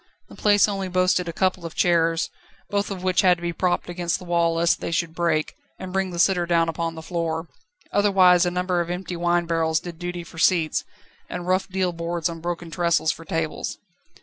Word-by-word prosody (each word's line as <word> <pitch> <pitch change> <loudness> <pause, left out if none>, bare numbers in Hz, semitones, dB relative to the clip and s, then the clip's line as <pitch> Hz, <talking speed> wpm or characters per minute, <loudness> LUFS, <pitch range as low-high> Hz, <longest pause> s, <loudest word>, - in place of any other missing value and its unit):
The - - -12
place 205 -1 +4
only 195 -2 -2
boasted 185 -1 +2
of - - -2
a - - -5
couple 185 0 0
of 165 -1 -7
chairs, 165 -1 +2 0.4
both 205 0 0
of 190 -2 -6
which 185 -1 +3
had 180 -1 +4
to - - -14
be 170 0 -1
propped 180 +1 0
against 175 -1 -1
the 180 - -11
wall 170 -1 +1
lest 170 +1 +2
they - - -3
should 170 -1 -1
break, 165 -2 0 0.2
and 185 -1 -7
bring 195 -1 0
the 175 - -6
sitter 175 0 +3
down 170 -1 +3
upon 165 0 -3
the 160 - -8
floor; 165 -1 -3 0.4
otherwise 185 -3 +5
a 175 - +2
number 180 0 0
of 170 - -4
empty 180 0 -4
wine 175 0 +1
barrels 165 -1 +1
did 170 -2 -9
duty 175 0 -4
for 165 0 -11
seats, 165 -3 +2 0.5
and 180 -1 -5
rough 185 +2 +1
deal 185 -2 0
boards 170 0 -2
on 165 -1 -6
broken 170 0 -4
trestles 170 -1 +2
for 165 - -10
tables. 160 0 -3
175 Hz, 215 wpm, -24 LUFS, 165-180 Hz, 0.5 s, otherwise